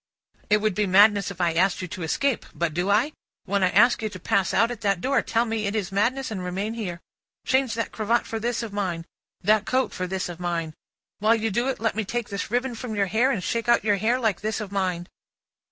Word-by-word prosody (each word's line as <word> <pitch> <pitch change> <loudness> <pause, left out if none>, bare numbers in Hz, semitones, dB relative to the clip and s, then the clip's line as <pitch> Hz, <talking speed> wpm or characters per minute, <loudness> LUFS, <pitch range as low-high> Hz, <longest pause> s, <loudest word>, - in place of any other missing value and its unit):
"It 210 0 +4
would 215 -1 +1
be 210 +2 0
madness 200 +2 +5
if 190 -3 -9
I 170 -2 +2
asked 180 +3 +2
you - - -4
to 180 - -7
escape; 260 - 0
but 170 -2 -1
do 175 +4 -1
I? 225 +9 +3 0.3
When 200 0 0
I 185 - +4
ask 230 +7 +4
you 215 - -1
to 185 - -9
pass 190 +2 +1
out 230 +1 +3
at 235 -3 -7
that 200 -4 +1
door, 270 +7 +1
tell 230 +1 0
me 220 -2 -2
it 200 - -2
is 200 -4 -2
madness 235 +6 0
and 190 -4 -4
remain 195 +5 -3
here. 185 -7 -5 0.4
Change 260 -4 +1
that 230 - -2
cravat 230 +2 0
for 225 - -4
this 235 +1 -1
of 220 -3 -6
mine, 180 -5 -2 0.4
that 215 0 +3
coat 260 +1 +1
for 185 - -3
this 190 +1 -2
of 175 -1 -8
mine. 170 -3 -2 0.5
While 215 +3 +4
you 225 -1 -1
do 240 +6 0
it, 265 - -3
let 225 -2 0
me 220 - 0
take 235 +2 -3
this 200 0 -4
ribbon 245 +2 0
from 230 -1 -5
your 200 -1 +2
hair, 220 +7 +2
and 220 -10 -1
shake 230 +4 -2
out 235 - +4
your 205 -2 +2
hair 230 +5 +1
like 220 -6 0
this 215 0 -2
of 210 -3 -6
mine!" 180 -3 -1
210 Hz, 250 wpm, -25 LUFS, 185-230 Hz, 0.5 s, madness